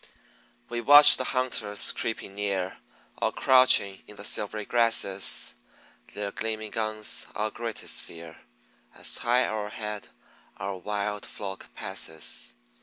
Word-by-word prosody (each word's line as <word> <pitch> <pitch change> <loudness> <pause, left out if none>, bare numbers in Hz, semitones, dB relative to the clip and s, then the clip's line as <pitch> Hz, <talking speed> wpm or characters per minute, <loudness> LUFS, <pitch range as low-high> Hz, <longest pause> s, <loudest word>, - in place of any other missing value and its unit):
We 120 0 -3
watch 145 +4 +9
the 130 - -2
hunters 120 -6 +1
creeping 110 -3 -4
near 100 -2 -3 0.4
Or - - +2
crouching 130 -7 +4
in 105 - -12
the 105 - -9
silvery 105 0 -2
grasses; 115 -5 +1 0.6
Their 100 -1 -3
gleaming 110 -1 -4
guns 110 -1 -1
our 110 +1 -1
greatest 115 -2 -4
fear, 85 -1 -11 0.6
As - - -1
high 125 +2 +2
o'erhead 105 0 -5 0.5
our 100 0 -4
wild 105 +1 -3
flock 95 -2 -8
passes. 80 -6 -3
105 Hz, 115 wpm, -27 LUFS, 100-115 Hz, 0.6 s, watch